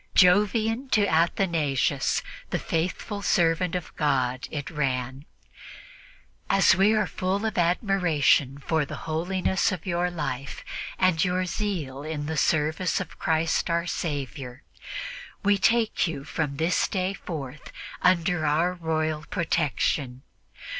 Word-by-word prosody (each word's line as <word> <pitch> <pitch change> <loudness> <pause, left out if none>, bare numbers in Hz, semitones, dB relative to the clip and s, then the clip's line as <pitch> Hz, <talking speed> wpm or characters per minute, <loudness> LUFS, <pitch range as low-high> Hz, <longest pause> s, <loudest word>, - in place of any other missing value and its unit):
"Jovian 215 +7 +4
to 205 -2 +4
Athanasius, 160 -5 +1 0.3
the - - 0
faithful 180 +5 -2
servant 170 -1 +2
of 180 - -5
God," 130 -4 0
it 145 -2 -5
ran. 135 -2 -2 1.2
"As 195 -1 +5
we 200 +4 +4
are 215 - +2
full 195 +2 -2
of 220 - -1
admiration 170 - +2
for 160 +2 0
the 140 - -6
holiness 180 +5 0
of 185 -4 -5
your 175 -1 0
life 145 -5 -5 0.3
and 185 -4 +3
your 185 0 +1
zeal 170 -9 -3
in 150 -1 -4
the 160 +1 -3
service 155 +3 +1
of - - -7
Christ 160 +2 +1
our 170 +1 +1
Saviour, 135 - -4 0.8
we 205 -1 +3
take 230 -1 +2
you 145 -4 -5
from 150 -1 -3
this 165 +4 +2
day 190 0 -1
forth 155 -7 -7 0.3
under 180 -2 +2
our 160 +4 +2
royal 155 -3 -1
protection. 145 -6 0
165 Hz, 125 wpm, -26 LUFS, 150-185 Hz, 1.2 s, As